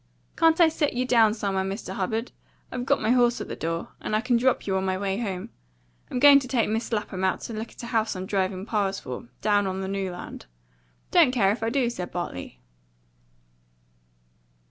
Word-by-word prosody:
"Can't 325 0 +4
I 340 - +8
set 310 -2 0
you 250 +1 0
down 225 -4 +4
somewhere, 195 -3 -1
Mr. 195 0 -5
Hubbard? 220 +5 -2 0.4
I've 250 +1 -4
got 280 - +3
my 220 - +2
horse 245 -1 +3
at - - -5
the - - -5
door, 165 +1 -3
and 215 - -2
I 215 - +2
can 245 +1 +1
drop 255 +2 +2
you 190 - 0
on 190 - 0
my 190 -1 0
way 195 +1 -2
home. 190 -6 -4 0.6
I'm - - -3
going 280 +2 +8
to 265 - -7
take 245 -3 +1
Mis' 225 +3 -2
Lapham 210 -4 -2
to 190 +4 -1
look 220 +1 -5
at - - -12
a - - -4
house 225 -3 0
I'm 185 0 -4
driving 190 -1 -1
piles 200 -3 -1
for, 125 -1 -7
down 205 -2 +2
on 190 0 -3
the 190 - -3
New 195 -1 -2
Land." 175 - -9 0.6
"Don't 335 -7 +6
care 210 -6 +3
if 220 - -3
I 225 - 0
do," 250 0 +1
said 180 -6 -6
Bartley. 90 - -5
215 Hz, 210 wpm, -26 LUFS, 190-245 Hz, 0.6 s, I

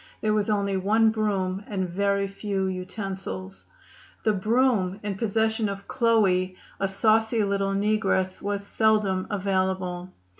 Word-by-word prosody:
There 215 -1 +1
was 210 0 +1
only 200 -2 +1
one 220 +4 +3
broom 200 -3 -1
and 190 -3 -2
very 200 +2 0
few 195 -1 -2
utensils. 190 0 -5 0.6
The 215 - +3
broom, 210 -2 +1
in 205 -1 -2
possession 220 +1 0
of 200 0 -7
Chloe, 195 -6 +2 0.2
a 195 - +1
saucy 220 +3 +2
little 195 -1 0
negress, 200 -2 +1
was 200 0 -3
seldom 210 -3 +1
available. 185 -2 -1
200 Hz, 125 wpm, -26 LUFS, 190-215 Hz, 0.6 s, one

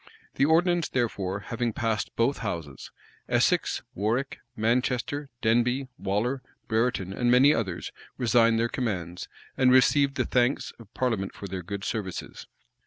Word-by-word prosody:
[*] - - -31
The 140 - +2
ordinance, 170 +2 +3
therefore, 100 -5 -1
having 115 +1 -2
passed 110 -2 -1
both 120 +5 +1
houses, 85 - -5 0.4
Essex, - - +2
Warwick, 115 +8 -1 0.2
Manchester, 125 +5 0
Denbigh, 125 +4 +2
Waller, 115 +7 -1 0.3
Brereton, 110 -5 0
and 120 +3 0
many 130 +4 +6
others, 95 -7 -3 0.3
resigned 115 -1 +4
their 115 +1 +2
commands, 90 - -3 0.3
and 130 -1 +4
received 135 +2 +4
the - - 0
thanks 125 +2 +1
of 110 -3 -14
parliament 115 -7 -1
for - - -8
their 95 -1 -5
good 100 +3 -6
services. 95 -5 -5
115 Hz, 140 wpm, -27 LUFS, 100-130 Hz, 0.4 s, many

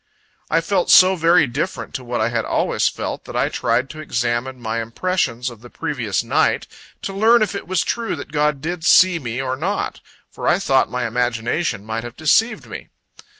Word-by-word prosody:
I 165 +1 +2
felt 185 +1 0
so 185 +1 +7
very 165 -1 +4
different 130 +4 -4
to 130 - -5
what 120 -1 -3
I 110 - +1
had 115 -1 -1
always - - 0
felt, - - -4
that - - -9
I - - +1
tried 130 - 0
to 155 - -10
examine 120 -2 -2
my 115 -1 -2
impressions 125 -1 -2
of 115 -2 -14
the 120 - -13
previous - - -2
night, - - +1 0.4
to 195 - -4
learn 220 +3 +4
if 210 - -2
it 200 - -6
was 185 -2 +1
true 230 -1 -2
that 145 - -9
God 150 -2 0
did 170 +1 -4
see 185 0 +5
me 120 -3 -4
or 130 -1 -2
not; 185 +9 -3 0.3
for - - -5
I - - +4
thought 135 -10 +2
my 125 +2 -2
imagination 120 - -1
might 110 +1 -4
have 120 -1 -9
deceived 220 +10 +2
me. - - -9
135 Hz, 195 wpm, -20 LUFS, 120-180 Hz, 0.4 s, so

